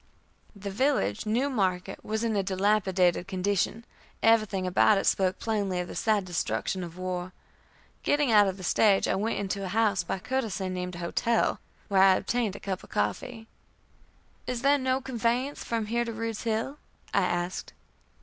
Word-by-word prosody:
The 200 0 -6
village, 255 -1 0
New 240 +6 +1
Market, 195 -7 -1
was 220 +1 -2
in 225 -2 0
a 200 - +2
dilapidated 190 -2 +1
condition; 200 +4 -1 0.4
everything 215 -4 +3
about 195 +3 +4
it - - -1
spoke 185 -1 +2
plainly 200 -5 -1
of 180 - -3
the - - -8
sad 215 -3 +1
destruction 175 - -2
of 170 0 -8
war. 185 0 -4 0.7
Getting 290 -4 +2
out 205 -2 +6
of 190 0 -2
the 185 - -9
stage 195 +3 +3
I - - +1
went 210 +4 -1
into 200 0 -3
a - - -3
house, 205 -2 +2
by 170 - -3
courtesy 215 -4 -2
named 180 -1 -4
a 170 0 -5
hotel, 230 +6 +1 0.3
where 195 -2 +3
I 190 -1 +7
obtained 225 -1 -1
a - - -7
cup 190 -2 -4
of - - -14
coffee. 225 -3 -2 1.0
"Is 245 -1 -3
there 285 +1 +4
no 260 0 0
conveyance 250 +2 -1
from 230 -2 -2
here 235 +3 0
to 230 - -4
Rude's 225 0 -4
Hill?" 230 +6 -1 0.3
I - - +4
asked. 175 +1 -2
205 Hz, 175 wpm, -28 LUFS, 185-230 Hz, 1.0 s, I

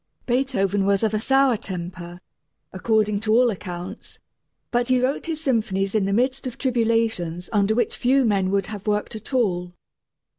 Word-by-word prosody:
Beethoven 215 -7 +1
was 200 +1 +2
of 220 -1 +1
a 215 - +1
sour 270 +1 +3
temper, 175 -4 -6 0.5
according 210 +1 +1
to 215 0 0
all 240 +1 +5
accounts, 180 0 -8 0.5
but 240 0 +1
he 255 -1 +3
wrote 260 +5 -1
his 320 -2 -3
symphonies 210 -6 0
in 215 -3 +2
the 195 - -1
midst 255 +5 0
of 250 - -7
tribulations 225 -9 0
under 205 +1 +2
which 240 - 0
few 260 +1 +2
men 195 -4 +1
would 195 -1 +1
have 210 0 -8
worked 210 +2 -1
at 220 +4 -9
all. 180 -8 0
215 Hz, 170 wpm, -23 LUFS, 195-245 Hz, 0.5 s, all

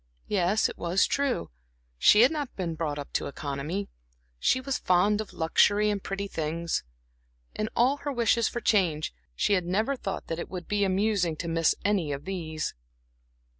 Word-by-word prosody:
Yes, 200 +2 +2
it - - -9
was 175 +3 +2
true 280 - -1 0.5
she 210 - +7
had 250 - +6
not 295 -4 -4
been 175 -4 -2
brought 155 -2 -3
up 145 - -7
to - - -1
economy, 150 +8 -4 0.5
she 255 - +3
was 265 0 -2
fond 200 +4 +3
of 215 - -8
luxury 205 +6 +3
and 200 -1 -2
pretty 195 +1 -3
things. 165 -1 -2 0.7
In 215 0 -2
all 255 +4 +3
her 290 0 -4
wishes 235 -2 +2
for 240 - -4
change, 170 - +1 0.2
she 205 - +2
had 180 -3 +2
never 215 +9 +1
thought 195 -6 -5
that 165 - -4
it - - -5
would 180 -2 -6
be 205 -1 +1
amusing 190 -3 +1
to 170 - -5
miss 165 -1 +2
any 195 -7 +1
of 140 +1 -5
these. 160 -5 -3
195 Hz, 175 wpm, -28 LUFS, 165-215 Hz, 0.7 s, she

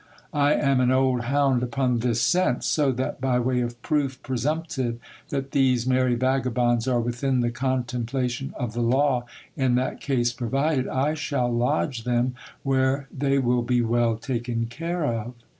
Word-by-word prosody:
I 145 0 +3
am 140 -2 +2
an 125 -1 +3
old 130 -2 +2
hound 135 -1 +2
upon 125 -1 0
this 120 -1 0
scent; 125 +2 +2
so 145 -3 +2
that, 130 +1 -3
by 130 -1 +2
way 125 0 +1
of 120 0 -4
proof 140 -4 0
presumptive 130 -2 -2 0.3
that 135 -1 -3
these 130 -3 +2
merry 130 -1 +2
vagabonds 125 -2 +1
are 125 -2 +2
within 125 +2 0
the 120 0 0
contemplation 125 0 -2
of 120 -4 -3
the 120 - -2
law 125 +1 +2 0.3
in 130 -2 +2
that 130 +1 -1
case 120 -3 0
provided, 135 +3 0
I 140 +4 0
shall 140 -5 -1
lodge 125 0 0
them 125 +1 +1 0.3
where 135 0 +1
they 140 0 +1
will 125 -2 +2
be 120 0 +1
well 115 -1 +1
taken 120 -1 -2
care 165 +7 -3
of. 120 -1 -3
125 Hz, 160 wpm, -25 LUFS, 120-135 Hz, 0.3 s, I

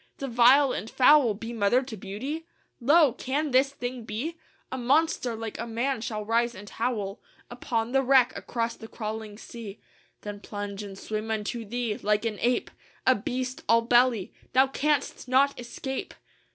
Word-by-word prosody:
The 275 - -4
vile 255 +3 +6
and 220 - -4
foul 260 -4 +5
Be 225 +3 -6
mother 230 +4 +2
to 250 -4 -7
beauty? 255 - -5 0.3
Lo! 290 +1 +5
can 280 +4 -2
this 260 +2 +4
thing 245 -2 -5
be? 235 +11 -4 0.4
A 260 - -3
monster 255 -1 +2
like 225 -1 -6
a 235 - -3
man 235 +2 -1
shall 215 -3 -4
rise 235 +2 +1
and 205 +2 -10
howl 215 -3 -3 0.3
Upon 235 -1 -2
the 270 +1 +3
wreck 260 -2 +4
across 230 -1 -3
the 225 - -10
crawling 215 -2 -6
sea, 220 -3 -9 0.4
Then 205 -1 -6
plunge; 205 -1 -6
and 200 -2 -8
swim 215 +2 -4
unto 220 +1 -2
thee; 230 0 -2
like 210 +1 +1
an 215 -3 -2
ape, 245 +1 +1 0.3
A 260 - +6
beast 255 +3 -3
all 230 0 +5
belly. 240 -4 +3 0.2
Thou 260 +1 +6
canst 280 0 -1
not 270 +2 +3
escape!" 260 +2 -5
235 Hz, 165 wpm, -27 LUFS, 215-260 Hz, 0.4 s, vile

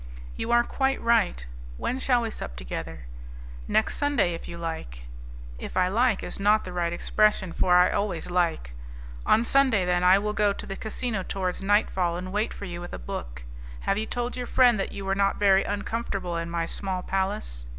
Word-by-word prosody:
"You 225 - -4
are 240 0 +5
quite 270 +2 0
right. 225 - +2 0.3
When 255 - -2
shall 245 -2 +2
we 225 - -3
sup 60 - -7
together?" 60 -1 -6 0.6
"Next 220 - +1
Sunday, 280 -12 +1
if 165 - -7
you 170 - -7
like." 160 - -6 0.6
"If - - -6
I 180 0 +3
like 230 +1 +2
is - - -5
not 210 +2 +4
the 180 - -7
right 170 -1 0
expression, 190 0 +1
for 180 -1 +3
I 180 0 +6
always 195 -4 -2
like. 170 - 0 0.5
On 225 +2 +4
Sunday, 260 -8 +3
then, 180 0 +1
I 185 +1 +7
will 210 +1 -1
go 205 -1 +2
to - - -8
the 195 - -5
casino 220 -1 -3
towards 185 -1 -3
nightfall, 190 -4 +1
and 185 +1 -6
wait 210 +2 0
for 200 - -7
you 175 -2 -6
with 175 - -8
a - - -5
book. - - -7 0.4
Have 195 - 0
you 220 - -3
told 245 0 -3
your 250 -1 -4
friend 245 -4 +4
that 195 - -2
you 195 - -6
were 195 - +1
not 195 0 +2
very 195 -1 +4
uncomfortable 205 -3 -3
in 165 0 -3
my 170 -1 -1
small 185 +1 -3
palace?" 60 - -3
195 Hz, 200 wpm, -26 LUFS, 175-220 Hz, 0.6 s, I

